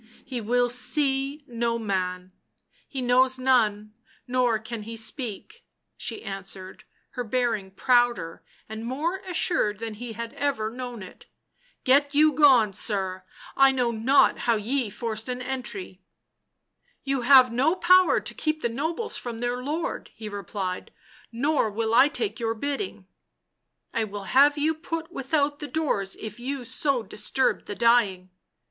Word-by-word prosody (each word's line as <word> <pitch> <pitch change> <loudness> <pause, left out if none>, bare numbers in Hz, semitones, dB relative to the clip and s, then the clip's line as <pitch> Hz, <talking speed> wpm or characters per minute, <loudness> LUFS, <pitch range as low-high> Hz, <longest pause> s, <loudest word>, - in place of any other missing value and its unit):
£/ - - -27 0.2
He 255 -3 -4
will 245 +3 +2
see 275 +2 0
no 235 -2 -1
man 185 -4 -3 0.3
— - - -38
he 265 -3 -4
knows 255 +1 +3
none 215 -5 +2 0.3
nor 245 -2 +2
can 220 +1 -7
he 225 +2 -7
speak," 230 - -5 0.3
she 240 -2 -6
answered, 195 -1 -7 0.3
her 245 - -4
bearing 230 -4 -1
prouder 240 -6 +1 0.2
and 220 +1 -7
more 295 +10 -2
assured 320 - +1
than 225 +1 -5
he 230 +2 -7
had 230 +1 -6
ever 240 -7 -1
known 245 -3 -6
it. 185 - -14 0.3
" - - -37
Get 280 +2 +3
you 305 +1 +5
gone, 255 -9 +5
sir; 190 -2 -1 0.3
I 270 0 +6
know 250 -3 0
not 235 +5 +3
how 230 - +5
ye 230 +3 -1
forced 225 +2 -4
an 250 0 -2
entry." 235 -8 -6 0.5
" 485 - -44
You 270 -1 -1
have 255 0 +7
no 275 +8 +2
power 365 0 +5
to - - -6
keep 310 0 -2
the 235 - +1
nobles 320 - -3
from 235 -2 -6
their 245 +1 -2
lord," 310 +6 -3
he 220 - -8
replied. 195 -2 -5 0.2
" - - -26
Nor 270 0 +1
will 220 +2 -2
I 255 +4 +7
take 300 +3 -3
your 225 -1 -1
bidding." 285 - -4 0.4
" - - -49
I 225 - 0
will 205 -1 -7
have 280 +8 +4
you 305 +2 +2
put 325 +1 -5
without 290 0 0
the 295 - -5
doors 270 -12 -1
if 215 +2 -7
you 260 +1 -4
so 275 -2 -1
disturb 220 +5 -1
the 205 - -6
dying." 205 -6 +2
245 Hz, 160 wpm, -26 LUFS, 215-280 Hz, 0.5 s, have